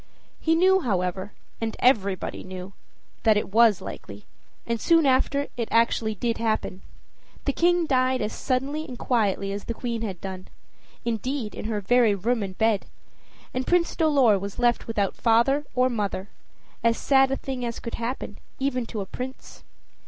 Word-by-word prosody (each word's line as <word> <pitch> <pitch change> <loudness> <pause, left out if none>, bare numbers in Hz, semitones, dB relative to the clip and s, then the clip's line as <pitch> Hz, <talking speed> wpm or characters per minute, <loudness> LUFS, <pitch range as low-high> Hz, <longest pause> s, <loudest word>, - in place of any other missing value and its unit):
He 325 0 +2
knew, 375 +3 +5
however, 190 - -1 0.3
and 225 -1 -3
everybody 200 -7 +1
knew, 185 +1 -8 0.5
that 220 -2 +4
it 210 - -2
was 225 -4 +5
likely, 100 +1 -9 0.4
and 230 -2 -2
soon 330 -2 +4
after 275 +2 +2
it 230 -2 -1
actually 230 -1 +2
did 230 +3 -1
happen. 215 -4 -1 0.6
The 280 - +1
King 350 +1 +3
died 255 -2 +2
as 210 +1 -2
suddenly 275 +4 -1
and 250 - -8
quietly 200 -6 0
as 200 0 -5
the 230 - -4
Queen 235 -2 -3
had 195 -6 -4
done 185 0 -7 0.6
indeed, 235 0 -2
in - - -7
her 215 -2 -2
very 230 0 +4
room 230 +4 0
and 190 -2 -5
bed; 220 -3 +1 0.7
and 255 +1 -2
Prince 350 -1 +2
Dolor 275 - +4
was 200 +1 -6
left 240 -1 +1
without 205 -4 0
either - - -27
father 245 +6 +3
or 255 0 +4
mother 205 -5 -2 0.5
as 230 0 +3
sad 270 -1 +4
a 270 - -1
thing 260 -2 -5
as 235 -1 -3
could 230 - -6
happen, 235 -3 -4 0.2
even 255 -3 -1
to 215 - -4
a - - -4
prince. 255 +6 -8
230 Hz, 170 wpm, -25 LUFS, 205-260 Hz, 0.7 s, knew